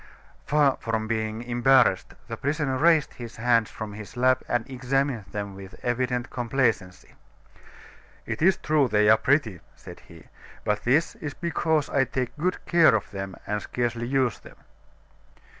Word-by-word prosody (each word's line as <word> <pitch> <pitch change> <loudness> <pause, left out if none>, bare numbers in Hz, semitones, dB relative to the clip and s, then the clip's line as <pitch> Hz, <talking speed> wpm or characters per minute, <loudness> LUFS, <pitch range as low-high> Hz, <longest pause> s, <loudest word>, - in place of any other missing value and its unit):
Far 145 -2 +3
from 110 -1 -2
being 110 0 -2
embarrassed, 120 -4 +3
the - - -5
prisoner 145 -1 -1
raised 160 -1 +3
his 120 -2 -9
hands 115 -1 +2
from 110 -2 -7
his 105 +2 -10
lap 130 +1 +3
and 120 -2 -1
examined 130 -3 -1
them 100 0 -6
with 95 0 -11
evident 125 0 -1
complacency. 115 -7 -1 1.1
"It - - -5
is 190 +3 +4
true 150 -3 +2
they 105 -2 +3
are 110 - +6
pretty," 125 - +1 0.2
said - - -12
he, 85 -2 -16 0.4
"but 105 0 -1
this 145 +7 +2
is 145 -3 -6
because 160 -3 0
I 135 -1 +2
take 130 -2 -3
good 180 +5 -2
care 170 -8 +5
of 110 - -3
them 95 -1 -6
and 105 0 -2
scarcely 120 +1 -3
use 130 -4 0
them." - - -15
120 Hz, 155 wpm, -25 LUFS, 110-140 Hz, 1.1 s, are